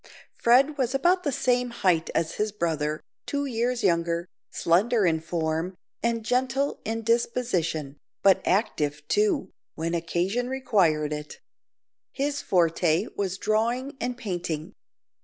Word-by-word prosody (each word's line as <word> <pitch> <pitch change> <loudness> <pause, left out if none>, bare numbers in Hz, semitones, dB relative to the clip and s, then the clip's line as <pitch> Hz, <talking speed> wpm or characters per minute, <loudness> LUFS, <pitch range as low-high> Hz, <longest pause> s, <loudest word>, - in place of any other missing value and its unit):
Fred 270 +5 +3
was 255 0 +1
about 350 +6 +3
the 295 -5 -1
same 250 -2 +1
height 180 -8 +1
as 165 -1 0
his 210 0 0
brother, 155 -5 -2 0.2
two 285 0 -1
years 245 -1 -1
younger, 170 0 +1 0.2
slender 205 +6 +2
in 160 -2 +2
form, 160 +2 -2 0.3
and 230 -1 -1
gentle 260 +3 0
in 225 +1 -3
disposition, 200 - 0 0.3
but 195 -1 +5
active, 150 -7 0
too, 205 -1 +1 0.2
when 165 +1 -2
occasion 180 +8 -1
required 175 - +1
it. 150 0 -7 0.7
His 285 +1 -1
forte 170 +1 +2
was 190 -2 -2
drawing 235 +7 0
and 245 0 -2
painting. 175 -5 -4
205 Hz, 125 wpm, -26 LUFS, 165-245 Hz, 0.7 s, but